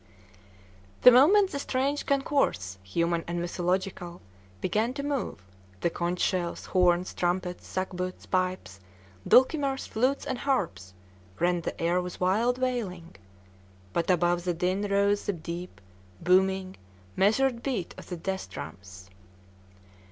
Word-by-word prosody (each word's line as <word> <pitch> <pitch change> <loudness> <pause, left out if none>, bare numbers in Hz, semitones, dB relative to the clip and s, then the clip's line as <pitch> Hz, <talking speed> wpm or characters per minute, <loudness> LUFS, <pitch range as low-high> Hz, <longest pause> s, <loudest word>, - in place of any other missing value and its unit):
The 250 - +11
moment 375 +11 +6
the 280 - -3
strange 275 +2 -1
concourse, 270 - 0
human 170 - -1
and 170 0 -2
mythological, 175 0 -2 0.4
began 220 - 0
to 280 - -3
move, 280 - -3 0.4
the 170 - +1
conch 175 +1 -2
shells, 175 -2 -1
horns, 180 -1 +2
trumpets, 180 0 -2
sackbuts, 185 -1 -4
pipes, 185 - -1 0.5
dulcimers, 270 0 +4
flutes, 255 +5 0
and 260 -2 -3
harps 100 - -2 0.4
rent 175 0 +1
the - - -4
air 175 +2 +1
with 180 0 -7
wild 220 +7 +2
wailing; 215 - -3 0.8
but 170 - -1
above 175 -1 +2
the 175 -1 -1
din 180 +3 0
rose 200 +1 +1
the 205 - +1
deep, 170 +1 -7 0.4
booming, 190 +1 +2 0.4
measured 235 +5 +2
beat 235 -11 -3
of - - -12
the 180 - -4
death 190 +3 -4
drums. 95 -1 -9
185 Hz, 125 wpm, -28 LUFS, 175-245 Hz, 0.8 s, The